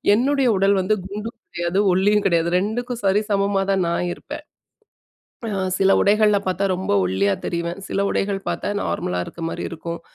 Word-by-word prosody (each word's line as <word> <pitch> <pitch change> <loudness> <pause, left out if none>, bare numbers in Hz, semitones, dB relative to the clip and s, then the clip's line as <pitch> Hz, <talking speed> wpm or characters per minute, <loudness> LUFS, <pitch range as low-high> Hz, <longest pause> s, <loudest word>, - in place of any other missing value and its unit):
என்னுடைய 270 +3 +2
உடல் 195 +1 +3
வந்து 200 +4 +1
குண்டும் 210 +4 -6 0.2
கிடையாது, 175 +3 0
ஒல்லியும் 205 +2 +3
கிடையாது 170 -2 +2
2க்கும் 240 +4 -3
சரிசமமா 200 0 +2
தான் 190 -3 +1
நான் 170 +1 -1
இருப்பேன். - - -9 1.0
அ 200 - -2 0.2
சில 195 0 +4
உடைகள்ல 210 0 +4
பார்த்தா 185 +2 0
ரொம்ப 185 - -2
ஒல்லியா 95 +2 +1
தெரிவேன். 170 +2 -3
சில 195 - -1
உடைகள் 195 0 -1
பார்த்தா - - -3 0.2
நார்மலா 90 0 -2
இருக்க - - -10
மாரி - - -5
இருக்கும். 170 0 -6
195 Hz, 155 wpm, -22 LUFS, 175-210 Hz, 1.0 s, சில